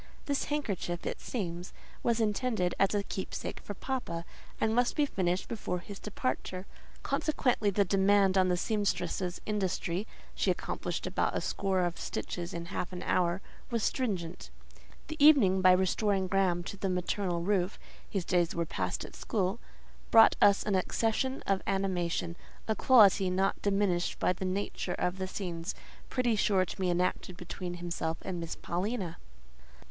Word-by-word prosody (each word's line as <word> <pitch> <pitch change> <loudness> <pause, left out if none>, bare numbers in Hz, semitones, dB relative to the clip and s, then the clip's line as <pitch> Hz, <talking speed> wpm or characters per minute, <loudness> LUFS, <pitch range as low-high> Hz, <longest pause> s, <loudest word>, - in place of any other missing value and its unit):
This 280 -1 0
handkerchief, 200 - -2
it - - -3
seems, 175 -6 -4 0.3
was 235 -1 +1
intended 215 -4 +1
as 195 +1 +3
a 205 - +1
keepsake 190 - -5
for 205 - -7
"papa," 190 -10 -3 0.3
and 220 0 +2
must 245 +1 +2
be 295 - +3
finished 185 -7 -1
before 210 -5 -3
his 195 +3 -9
departure; 185 0 -3 0.4
consequently 250 -8 +1
the 200 0 +2
demand 195 0 +4
on 185 -1 +4
the 180 -1 +2
sempstress's 180 -3 -1
industry 195 -1 -1 0.3
(she - - 0
accomplished - - -2
about - - 0
a - - +1
score 190 -2 0
of 175 -1 -1
stitches 175 -1 -4
in 170 0 -5
half 180 - -3
an 180 0 -6
hour) 180 +1 +1 0.3
was 230 -3 -1
stringent. 185 -9 -2 0.6
The 315 -2 -2
evening, 220 -12 +7
by 185 0 +7
restoring 190 +1 +2
Graham 185 -2 +1
to 200 - -7
the 195 0 -1
maternal 180 -1 -1
roof 190 0 +1 0.3
(his 190 -4 -2
days 175 -2 +1
were 170 0 0
passed - - -3
at - - -11
school), 200 0 -1 0.5
brought 225 0 +8
us 200 -1 +6
an 210 - -1
accession 225 +7 0
of 195 -1 +1
animation—a 180 +1 -2
quality 205 -7 +6
not 190 +2 0
diminished 195 -3 +1
by - - +2
the 190 - -5
nature 185 -1 -2
of 180 +2 -1
the 190 - -2
scenes 175 -2 -4 0.3
pretty 245 -3 +1
sure 195 -2 +3
to - - -7
be 185 -2 0
enacted 180 0 0
between 180 0 -5
him 175 0 -6 0.3
and 180 -2 -3
Miss 165 -1 -4
Paulina. 185 0 -3
190 Hz, 155 wpm, -31 LUFS, 180-210 Hz, 0.6 s, brought